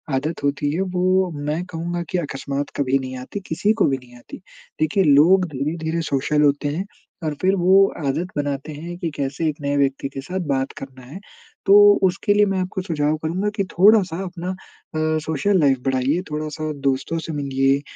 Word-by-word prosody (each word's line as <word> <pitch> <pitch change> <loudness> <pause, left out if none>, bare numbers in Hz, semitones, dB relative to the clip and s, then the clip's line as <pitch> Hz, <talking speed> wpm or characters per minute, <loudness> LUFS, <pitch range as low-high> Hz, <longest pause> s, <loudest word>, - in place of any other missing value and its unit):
आदत 150 +3 -3
होती 145 +1 0
है 180 - 0
वो 185 0 +1
मैं 150 +4 -2
कहूँगा 175 0 -4
कि 185 - 0
अकस्मात 140 -2 -4
कभी 135 -1 +2
नहीं 130 0 -6
आती, 130 +11 -6
किसी 205 +7 +1
को 225 - +2
भी 135 -1 +1
नहीं 125 -1 -16
आती। 120 - -11 0.4
देखिए 155 +5 +2
लोग 170 +5 +5
धीरे-धीरे 160 +4 -2
सोशल 150 +2 +1
होते 145 0 +2
हैं 190 - -2 0.4
और 155 - -1
फिर 190 +1 +3
वो 190 +2 +5 0.2
आदत 155 +6 -1
बनाते 145 +1 -3
हैं 170 +4 -7
कि 170 - -2
कैसे 140 +4 -2
1 150 - -3
नए 140 0 -1
व्यक्ति 140 -1 0
के 135 0 -7
साथ 180 +7 -4
बात 135 -1 0
करना 130 -1 -10
है। 150 +9 -9 0.5
तो 195 - +5 0.3
उसके 190 +3 +2
लिए 205 0 +4
मैं 195 -1 0
आपको 185 +1 -3
सुझाव 155 -4 0
करूँगा 185 +6 -1
कि 200 - 0
थोड़ा-सा 190 -2 +4
अपना 180 0 -6
अ, - - -5 0.7
सोशल 160 +6 +1
लाइफ़ 135 -4 +3
बढ़ाइए, 135 +5 +1
थोड़ा-सा 155 0 -3
दोस्तों 135 +4 0
से 160 0 -6
मिलिए, 135 -1 +1
155 Hz, 185 wpm, -21 LUFS, 140-180 Hz, 0.7 s, लोग